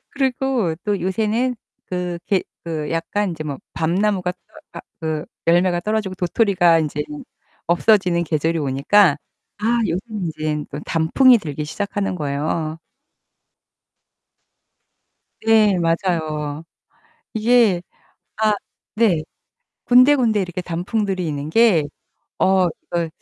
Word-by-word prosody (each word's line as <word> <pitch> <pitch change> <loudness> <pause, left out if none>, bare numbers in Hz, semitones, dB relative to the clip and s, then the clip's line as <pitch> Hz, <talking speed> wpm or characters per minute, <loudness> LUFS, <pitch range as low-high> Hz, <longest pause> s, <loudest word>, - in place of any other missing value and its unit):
그리고 265 - 0
또 205 -2 0
요새는 220 +7 0 0.3
그 180 -1 -3
게 195 -2 +1 0.2
그 155 -3 -3
약간 180 +4 -1
이제 160 - -6
뭐 145 -3 -5
밤나무가 180 +3 0
떠 180 - -36 0.4
아, - - -7 0.2
그 155 -2 -2 0.2
열매가 175 +1 +3
떨어지고 210 0 -2
도토리가 180 -2 +3
인제는 160 - -4 0.4
없어지는 180 0 +3
계절이 165 0 0
오니까 145 +5 +3 0.4
아 230 +3 +1
요새는 195 +2 -3
인제 150 -1 -2
또 145 - -6
단풍이 235 +11 +4
들기 150 -6 -5
시작하는 200 +4 -3
거예요. 155 +1 -2 2.6
네. 220 -3 +4
맞아요. 160 -3 -1 0.7
이게 220 -5 +3 0.6
아, 215 -1 +3 0.4
네. 210 -8 +3 0.6
군데군데 250 -4 +5
이렇게 180 -1 -3
단풍들이 185 +2 -2
있는 145 -1 -4
게 205 -6 +4 0.5
'어, 190 -1 +3
이거 170 +1 -4
180 Hz, 235 characters per minute, -20 LUFS, 160-215 Hz, 2.6 s, 군데군데